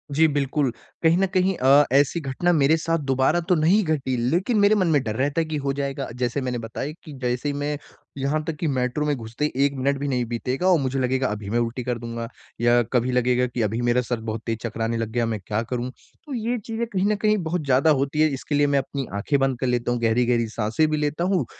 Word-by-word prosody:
जी 160 +2 +5
बिल्कुल। 140 -2 0 0.3
कहीं 165 +1 +5
न 195 - +3
कहीं 185 +1 +2
अ, 140 +3 +5
ऐसी 140 +5 +3
घटना 150 +4 0
मेरे 155 0 +4
साथ 165 +1 0
दोबारा 135 +5 +3
तो 180 - +5
नहीं 175 +7 +3
घटी 145 -6 -1
लेकिन 190 - +1
मेरे 205 +1 +5
मन 185 -4 +2
में 145 -3 +3
डर 110 -3 -3
रहता 145 +6 0
है - - -1
कि 155 -1 -2
हो 140 - +1
जाएगा। 140 0 -3
जैसे 125 +2 -1
मैंने 125 -1 -2
बताया 115 +5 -5
कि 155 - -10
जैसे 125 +3 -1
ही - - -2
मैं 145 +1 -2 0.4
यहाँ 140 +3 -1
तक 160 0 -4
कि 165 - -1
मेट्रो 130 +1 0
में 150 -1 +1
घुसते 115 +3 -4
ही 150 - -1
1 140 - 0
मिनट 140 +1 0
भी 145 - -2
नहीं 125 -3 0
बीतेगा 125 +8 -2
और 180 -3 +5
मुझे 135 0 -1
लगेगा 130 0 +1
अभी 105 -2 -5
मैं 115 +3 +1
उल्टी 120 +1 -2
कर 125 0 -2
दूँगा 115 0 -5 0.3
या 120 0 +4
कभी 125 0 +2
लगेगा 125 0 +2
कि 120 0 -3
अभी 110 +2 0
मेरा 120 +1 +2
सर 120 -1 -3
बहुत 110 +1 -4
तेज़ 115 -1 -1
चकराने 115 0 -2
लग 115 -1 -2
गया, 120 0 0
मैं 110 -2 -2
क्या 105 +1 0
करूँ? 125 +1 -3 0.4
तो 295 - -7
ये 240 0 -1
चीज़ें 225 +1 -4
कहीं 190 -3 -1
न - - +2
कहीं 215 +1 +2
बहुत 165 0 -2
ज़्यादा 135 +3 +3
होती 140 +3 0
हैं 155 - +5
इसके 140 +2 -3
लिए 145 0 +3
मैं 140 -1 +3
अपनी 135 0 -4
आँखें 140 +8 +1
बंद 135 -2 +1
कर 130 - -1
लेता 120 -1 0
हूँ, 120 - 0
गहरी-गहरी 115 0 +2
साँसें 110 +7 0
भी 155 - 0
लेता 150 +2 -1
हूँ। 180 -6 +1
135 Hz, 250 wpm, -24 LUFS, 120-155 Hz, 0.4 s, जी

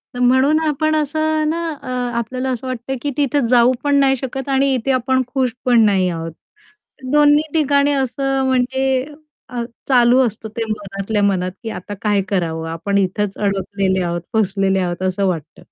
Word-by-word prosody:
तर - - -5
म्हणून 260 +5 +4
आपण 310 +1 +1
असं 310 +1 0
ना, 335 +1 -2
अ, - - -11 0.3
आपल्याला 255 +3 -3
असं 255 0 -3
वाटतं, 255 +1 -4
की 290 - -2
तिथे 290 -1 +1
जाऊ 245 0 +5
पण 285 -1 +2
नाही 270 -1 +4
शकत 265 +1 -5
आणि 270 0 +2
इथे 260 +1 0
आपण 260 0 +1
खुश 255 -2 -1
पण 240 -2 +5
नाही 190 -3 +2
आहोत. 165 -1 -4 0.8
दोन्ही 295 +1 +5
ठिकाणी 285 -2 +2
असं 270 0 0
म्हणजे 260 +1 +1 0.4
अ, 245 -1 -4 0.3
चालू 245 -1 +5
असतं 220 -1 -5
ते 230 - 0
मनातल्या 205 0 -3
मनात, 185 -2 +1
की 225 - -4
आता 205 0 -7
काय 205 -2 +2
करावं, 165 -4 -1
आपण 185 +5 -2
इथेच 200 +1 0
अडकलेले 195 -1 0
आहोत, 175 -1 -2
फसलेले 195 -2 +1
आहोत 175 -1 -2
असं 190 +1 0
वाटतं 165 -5 -4
245 Hz, 170 wpm, -19 LUFS, 195-270 Hz, 0.8 s, जाऊ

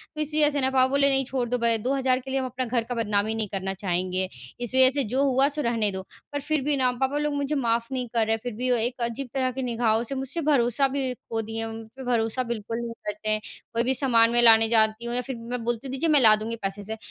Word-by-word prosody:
तो 305 - -2
इसी 305 +1 0
वज़ह 295 - +5
से 285 - 0
ना 260 - +2
पापा 260 -1 +3
बोले 280 +1 +3
नहीं 270 0 +2
छोड़ 255 -1 -2
दो 250 - +1
भाई 235 -1 +2
2000 260 +3 +1
रुपए - - -6
के 265 - -6
लिए 270 - +1
हम 260 - -2
अपना 255 0 -3
घर 235 -1 0
का 245 +2 -5
बदनामी 215 -1 0
नहीं 220 -1 -2
करना 195 0 -2
चाहेंगे। 185 -1 -2 0.3
इस 240 -1 -3
वज़ह 260 0 +7
से 280 +1 -1
जो 270 +2 +2
हुआ 270 0 +3
सो 295 +1 -1
रहने 230 -5 0
दो। 190 0 -5 0.3
पर 285 - -1
फिर 300 +1 0
भी 295 +1 +1
ना 255 -1 +3
पापा 265 +3 -1
लोग 295 0 -1
मुझे 285 +1 -1
माफ़ 230 -3 0
नहीं 255 -2 -2
कर 230 -2 +2
रहे 220 - -1
हैं 225 - -1
फिर 245 -2 -4
भी 250 +3 -2
वो 245 - +3
एक 245 +2 -2
अजीब 235 +3 -3
तरह 260 -2 0
के 265 +1 -5
निगाहों 230 -2 +1
से 255 +3 -5
मुझसे 270 +5 -3
भरोसा 250 0 +3
भी 265 -1 -2
खो 225 -2 -5
दिए 225 +1 -4
मुझ 225 - -7 0.2
पे 265 - -8
भरोसा 240 0 0
बिल्कुल 230 -2 -4
नहीं 235 -1 -5
करते 210 +1 -3
हैं। 215 0 +1 0.3
कोई 230 0 +1
भी 260 +2 +1
सामान 240 -4 +3
मैं 240 0 +4
लाने 225 -1 +6
जाती 220 0 +2
हूँ 235 0 -3
या 250 - +1
फिर 260 +1 -6
मैं 235 +1 -5
बोलती 240 +2 -2
हूँ - - -6
दीजिए 290 +5 0
मैं 300 -2 +6
ला 220 -4 +7
दूँगी 220 +2 -4
पैसे 195 +1 -3
से 220 +2 -6
245 Hz, 290 wpm, -25 LUFS, 225-265 Hz, 0.3 s, वज़ह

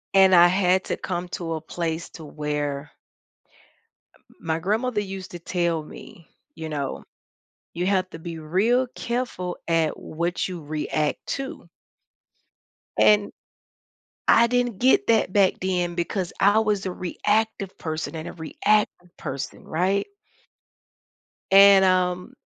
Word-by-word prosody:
And 190 -1 +7
I 175 0 +8
had 185 0 +2
to - - -2
come 180 -1 -4
to 165 -2 -3
a 155 - -5
place 165 0 -4
to 160 - -11
where 150 -1 -3 1.3
Um, - - -29 0.2
my 160 0 -2
grandmother 215 +4 0
used 190 -2 -7
to 175 - -7
tell 170 -2 -1
me, 165 +2 -13 0.2
you 160 -1 -7
know, 140 -3 -4 0.7
"You 175 +1 -2
have 185 -2 +1
to 165 - -9
be 165 0 -7
real 205 +11 +2
careful 235 -7 -3
at 165 -2 +1
what 170 +3 -2
you 180 -3 -6
react 150 0 -2
to." 270 -1 -7 1.3
And, 210 -1 +4 1.0
I 235 - +6
didn't 245 -3 0
get 255 +5 +3
that 225 -4 +3
back 195 -2 +4
then 180 -2 -1
because 175 +1 -2
I 205 +2 +5
was 210 -3 0
a 185 - -2
reactive 205 +2 -1
person 160 0 -4
and 160 0 -5
a - - -7
reactive 180 +2 0
person, 135 0 -6
right? 185 +5 0 1.5
And, 195 0 +8
um, 180 +3 +1
180 Hz, 135 wpm, -24 LUFS, 165-200 Hz, 1.5 s, I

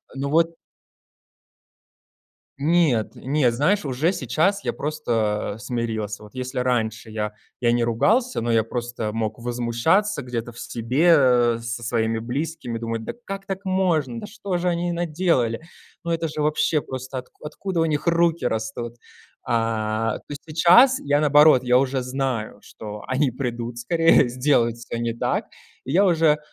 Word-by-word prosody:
ну 140 +1 -3
вот 165 +2 +2 2.0
Нет, 150 -7 +2
нет, 135 -2 +1
знаешь, 155 - +1
уже 140 +7 +1
сейчас 175 - 0
я - - -1
просто 115 -9 -2
смирился. 110 -3 -3
Вот 105 - -14
если 130 +1 -5
раньше 115 -3 -1
я 105 -1 -3 0.3
я 120 - +3
не 120 0 +2
ругался, 215 - +1
но 120 +1 -1
я 115 -1 +3
просто 120 -1 -4
мог 110 -1 -2
возмущаться 120 - 0
где-то 120 -1 -4
в 115 - -12
себе 125 -2 +3
со 115 +1 -5
своими 115 -1 0
близкими, 125 +1 -4
думать: 115 -1 -3
"Да - - -5
как 195 0 -6
так 195 -1 -5
можно? 170 - 0
Да - - -7
что 200 -3 -4
же 180 +1 0
они 175 0 -1
наделали? 165 -8 0 0.4
Ну 170 - -4
это 165 0 0
же 150 0 -4
вообще 150 0 +1
просто 130 0 -6
откуд 125 +4 -15
откуда 175 +4 -4
у 165 - +3
них 150 +1 -2
руки 170 0 +2
растут?". 115 +1 -3 0.5
А 115 -1 0
то 145 - -6
сейчас 180 - +6
я, 145 +1 +1
наоборот, 150 -2 +6
я 125 0 +4
уже 130 0 +1
знаю, 130 -3 -3
что 105 -1 -9
они 130 +2 +1
придут 120 -2 -4
скорее, 165 +3 +4
сделают 120 -2 +1
всё 120 0 -6
не 115 0 -2
так, 115 - -1 0.4
и 130 - -4
я 185 +6 +4
уже 160 -4 +3
130 Hz, 155 wpm, -23 LUFS, 115-165 Hz, 2.0 s, сейчас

